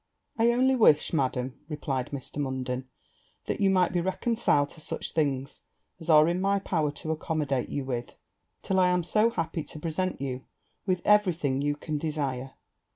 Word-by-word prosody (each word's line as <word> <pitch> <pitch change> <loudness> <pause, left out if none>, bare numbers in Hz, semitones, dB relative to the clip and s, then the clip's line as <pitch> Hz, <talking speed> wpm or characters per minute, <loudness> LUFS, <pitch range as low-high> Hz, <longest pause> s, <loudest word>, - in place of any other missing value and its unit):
'I 235 +1 +5
only 260 +2 +3
wish, 165 - +4
Madam,' 130 -3 -1
replied 135 -4 -2
Mr. 140 0 -7
Munden, 130 -2 -3 0.6
'that - - -3
you 195 - +4
might 185 -2 +3
be 175 - +1
reconciled 185 -6 +1
to 160 - -11
such - - -4
things 140 -4 -1 0.4
as 165 - -9
are 155 -1 +7
in 175 +2 0
my 200 +1 +2
power 165 -6 0
to 160 +2 -4
accommodate 150 -5 -1
you 140 -2 -3
with, 120 -2 -4 0.5
till 190 -1 +1
I 180 -1 +5
am 180 -1 +2
so 215 +6 +3
happy 165 -6 -3
to 155 - -10
present 175 +4 -2
you 130 -1 -4 0.4
with 185 -2 0
every 210 -4 +5
thing 140 -4 -1
you 145 0 0
can 150 0 -4
desire.' 140 -4 -3
155 Hz, 175 wpm, -28 LUFS, 135-185 Hz, 0.6 s, are